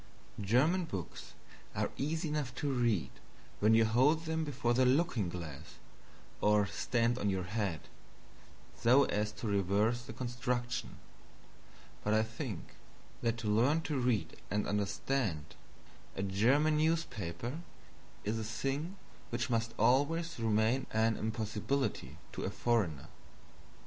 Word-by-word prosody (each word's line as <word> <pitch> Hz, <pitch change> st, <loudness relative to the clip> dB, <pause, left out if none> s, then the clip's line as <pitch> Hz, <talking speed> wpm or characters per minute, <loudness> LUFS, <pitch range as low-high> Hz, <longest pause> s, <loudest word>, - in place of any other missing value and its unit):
German 145 Hz, -, +3 dB
books 95 Hz, -, -7 dB, 0.4 s
are -, -, 0 dB
easy 160 Hz, +3 st, -1 dB
enough 145 Hz, -5 st, -2 dB
to 140 Hz, 0 st, -1 dB
read 110 Hz, -, +1 dB, 0.5 s
when 110 Hz, +2 st, +5 dB
you 115 Hz, 0 st, +5 dB
hold 140 Hz, +9 st, +3 dB
them 160 Hz, 0 st, -1 dB
before 130 Hz, -5 st, 0 dB
the 130 Hz, +2 st, +4 dB
looking 125 Hz, -, +2 dB
glass 85 Hz, -5 st, -7 dB, 0.7 s
or 105 Hz, 0 st, +4 dB
stand 120 Hz, +3 st, 0 dB
on 100 Hz, -, +1 dB
your 95 Hz, -1 st, 0 dB
head 95 Hz, -3 st, -2 dB, 0.9 s
so 125 Hz, +4 st, +5 dB
as 105 Hz, -4 st, 0 dB
to 110 Hz, -, -8 dB
reverse 100 Hz, +4 st, +2 dB
the 120 Hz, -, -9 dB
construction 125 Hz, +1 st, -3 dB, 1.1 s
but 105 Hz, +1 st, +2 dB
I 110 Hz, -, +4 dB
think 110 Hz, -, -6 dB, 0.5 s
that 115 Hz, 0 st, 0 dB
to 115 Hz, -, -4 dB
learn 125 Hz, +10 st, +3 dB
to 150 Hz, -4 st, -2 dB
read 125 Hz, -4 st, 0 dB
and 105 Hz, +1 st, 0 dB
understand 105 Hz, -, -1 dB, 0.6 s
a 95 Hz, -, -2 dB
German 130 Hz, +11 st, +3 dB
newspaper 140 Hz, -, -1 dB, 0.6 s
is 110 Hz, +2 st, -1 dB
a -, -, -3 dB
thing 135 Hz, -, -3 dB, 0.3 s
which 120 Hz, +1 st, -2 dB
must 115 Hz, 0 st, 0 dB
always 165 Hz, +5 st, +2 dB
remain 110 Hz, +3 st, +2 dB
an 110 Hz, 0 st, +2 dB
impossibility 110 Hz, -, -2 dB
to -, -, -5 dB
a -, -, -1 dB
foreigner. 100 Hz, -, 0 dB
115 Hz, 130 wpm, -33 LUFS, 105-135 Hz, 1.1 s, when